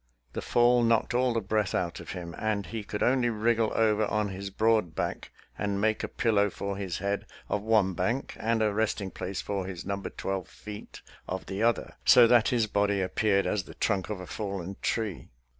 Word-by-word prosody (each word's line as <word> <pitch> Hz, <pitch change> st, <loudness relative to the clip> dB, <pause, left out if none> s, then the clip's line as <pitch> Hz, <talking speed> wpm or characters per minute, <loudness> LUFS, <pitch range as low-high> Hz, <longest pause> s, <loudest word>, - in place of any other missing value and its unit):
The -, -, -3 dB
fall 120 Hz, 0 st, +4 dB
knocked 115 Hz, -1 st, +2 dB
all 125 Hz, +1 st, +2 dB
the 115 Hz, -1 st, 0 dB
breath 105 Hz, -1 st, 0 dB
out 85 Hz, -1 st, -1 dB
of -, -, -7 dB
him, 85 Hz, -2 st, -6 dB
and 105 Hz, -2 st, -1 dB
he 110 Hz, -1 st, -5 dB
could 105 Hz, +1 st, -3 dB
only 125 Hz, -1 st, +3 dB
wriggle 115 Hz, 0 st, +1 dB
over 110 Hz, -1 st, +3 dB
on 105 Hz, 0 st, 0 dB
his 100 Hz, +1 st, -5 dB
broad 110 Hz, -4 st, +2 dB
back -, -, -3 dB, 0.3 s
and 100 Hz, -1 st, -1 dB
make 110 Hz, +1 st, +1 dB
a -, -, -1 dB
pillow 105 Hz, -3 st, +2 dB
for 100 Hz, +1 st, -4 dB
his 95 Hz, -3 st, -3 dB
head 100 Hz, +1 st, -2 dB, 0.2 s
of 105 Hz, -, -1 dB
one 105 Hz, -3 st, +3 dB
bank 115 Hz, +10 st, -1 dB
and 115 Hz, 0 st, +1 dB
a 105 Hz, -1 st, +1 dB
resting 105 Hz, -2 st, -1 dB
place 95 Hz, +1 st, -4 dB
for 100 Hz, -2 st, -3 dB
his 90 Hz, -3 st, -6 dB
number 100 Hz, 0 st, -3 dB
twelve 95 Hz, -1 st, -4 dB
feet 105 Hz, 0 st, -10 dB, 0.2 s
of 95 Hz, 0 st, -4 dB
the 95 Hz, +2 st, -4 dB
other, 115 Hz, 0 st, +1 dB
so 125 Hz, -, +8 dB
that 120 Hz, -1 st, +5 dB
his 120 Hz, -3 st, +2 dB
body 100 Hz, -1 st, +1 dB
appeared 100 Hz, +1 st, +1 dB
as 100 Hz, -3 st, -1 dB
the -, -, -12 dB
trunk 100 Hz, -2 st, 0 dB
of 105 Hz, -3 st, -3 dB
a 90 Hz, -, -7 dB
fallen 100 Hz, -2 st, -4 dB
tree. 110 Hz, -6 st, -2 dB
105 Hz, 205 wpm, -28 LUFS, 95-110 Hz, 0.3 s, so